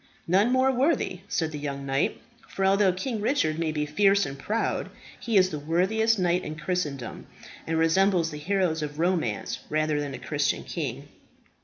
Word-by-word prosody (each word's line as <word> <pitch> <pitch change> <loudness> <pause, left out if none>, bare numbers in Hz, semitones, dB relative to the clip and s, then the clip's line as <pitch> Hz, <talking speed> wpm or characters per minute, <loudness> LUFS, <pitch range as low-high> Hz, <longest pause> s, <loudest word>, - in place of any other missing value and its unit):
"None 195 +7 +3
more 260 +1 +4
worthy," 265 - +1
said 160 -2 -1
the 150 - -5
young 140 -1 -4
knight, 135 +1 0 0.3
"for 195 - -2
although 195 0 +4
King 215 +4 -3
Richard 165 - +1
may 165 -2 0
be 150 -1 -1
fierce 200 +6 +3
and 135 0 -7
proud, 220 +10 -1 0.3
he 230 -3 +1
is 185 -1 +5
the 150 - -4
worthiest 190 +9 +2
knight 180 -1 +1
in 155 - -5
Christendom, 150 -6 -3 0.4
and 165 0 0
resembles 165 +1 +3
the 150 - -6
heroes 175 -1 0
of 150 -1 -5
romance 165 - -1
rather 155 -1 +1
than 140 -2 -4
a - - -6
Christian 145 -2 -1
king." 140 -4 -5
165 Hz, 175 wpm, -26 LUFS, 150-195 Hz, 0.4 s, is